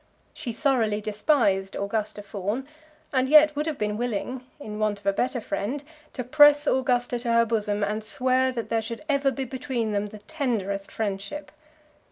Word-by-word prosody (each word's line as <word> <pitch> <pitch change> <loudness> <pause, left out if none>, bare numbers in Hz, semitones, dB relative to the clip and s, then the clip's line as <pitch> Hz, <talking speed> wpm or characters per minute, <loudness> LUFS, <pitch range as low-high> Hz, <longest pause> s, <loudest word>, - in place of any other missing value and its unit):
She 240 - -5
thoroughly 230 -4 +1
despised 210 -2 +1
Augusta 205 +1 -2
Fawn, 205 +6 -3 0.5
and 260 0 +2
yet 305 0 +7
would 300 +2 -1
have 310 -3 -2
been 210 0 -1
willing, 245 +2 -3 0.2
in 210 -6 -7
want 215 -1 +1
of 200 - -27
a 200 - +3
better 250 +4 0
friend, 220 +7 -3 0.3
to 250 - -3
press 290 +4 +6
Augusta 250 -3 +1
to 235 -1 -1
her 230 0 +5
bosom, 210 -2 0
and 215 +1 -1
swear 255 +3 +2
that 235 -3 -5
there 225 -1 +1
should 230 +3 -6
ever 280 -2 +2
be 270 0 -3
between 255 -3 -3
them 205 0 -1
the 215 +1 -10
tenderest 210 -6 -3
friendship. 205 +6 -4
230 Hz, 175 wpm, -26 LUFS, 210-265 Hz, 0.5 s, yet